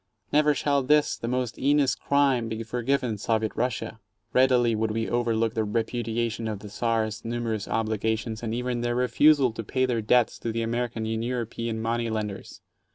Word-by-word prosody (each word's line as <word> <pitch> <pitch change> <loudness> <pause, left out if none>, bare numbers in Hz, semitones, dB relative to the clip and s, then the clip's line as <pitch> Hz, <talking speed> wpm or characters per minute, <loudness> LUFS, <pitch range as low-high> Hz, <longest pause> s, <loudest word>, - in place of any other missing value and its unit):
Never 150 0 +4
shall 140 0 +1
this, 150 +3 +3
the 115 - -6
most 125 -1 -2
heinous 140 -2 +3
crime, 135 -4 +1
be 110 0 -4
forgiven 125 -1 -1
Soviet 110 0 0
Russia! 115 -2 -2 0.3
Readily 125 -2 +4
would 110 0 0
we 110 +1 -1
overlook 115 -2 0
their 110 -2 0
repudiation 115 +1 -2
of 110 -2 -3
the 105 +1 -10
Czar's 110 0 -1
numerous 115 -2 -3
obli 110 -1 -1
gations 110 0 -2
and 115 -2 -3
even 120 +1 -2
their 120 0 -1
refusal 130 +2 +4
to 115 +1 -6
pay 130 +5 0
their 120 -3 0
debts 120 +2 +2
to 115 - -3
the 115 +1 -2
American 120 -1 -2
and 110 0 -2
European 115 -2 -3
money 115 +1 -1
lenders. 105 -3 -5
115 Hz, 175 wpm, -26 LUFS, 110-125 Hz, 0.3 s, Never